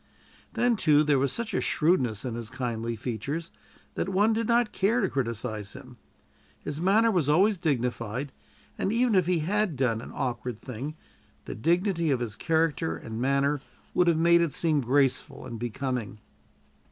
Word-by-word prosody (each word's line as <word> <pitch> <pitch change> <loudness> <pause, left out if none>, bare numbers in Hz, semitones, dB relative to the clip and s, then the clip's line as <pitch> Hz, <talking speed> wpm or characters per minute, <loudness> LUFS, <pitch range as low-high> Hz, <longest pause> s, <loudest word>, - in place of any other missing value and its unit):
Then, 240 -2 +2
too, 150 -4 +4
there 145 -3 +3
was 135 -1 +1
such 235 +5 -3
shrewdness 130 - +1
in 125 - -3
his 115 -1 -5
kindly 115 -2 -3
features 135 - -4 0.4
that - - -2
one 205 +4 +3
did 225 0 -1
not 235 -1 +2
care 210 +6 +1
to 200 - +2
criticise 115 -5 -3
him. 130 -2 -12 0.6
His 150 +2 -5
manner 215 +5 +4
was 170 -8 +1
always 190 +5 +4
dignified, 125 -3 -2 0.5
and 195 - 0
even 235 +1 +2
if 185 -3 +3
he 180 -3 +2
had 200 +1 0
done 120 -4 0
an - - -9
awkward 125 -3 -3
thing 130 +6 -6 0.5
the - - -5
dignity 170 - +1
of 135 -3 +2
his 115 -4 -3
character 160 - 0
and 110 +5 -6
manner 140 +2 +1 0.3
would 180 - +3
have 170 -2 +4
made 170 +1 +5
it 165 -4 0
seem 155 -4 +2
graceful 135 +2 +1
and 115 -3 -7
becoming. 120 -2 -3
145 Hz, 165 wpm, -27 LUFS, 125-180 Hz, 0.6 s, made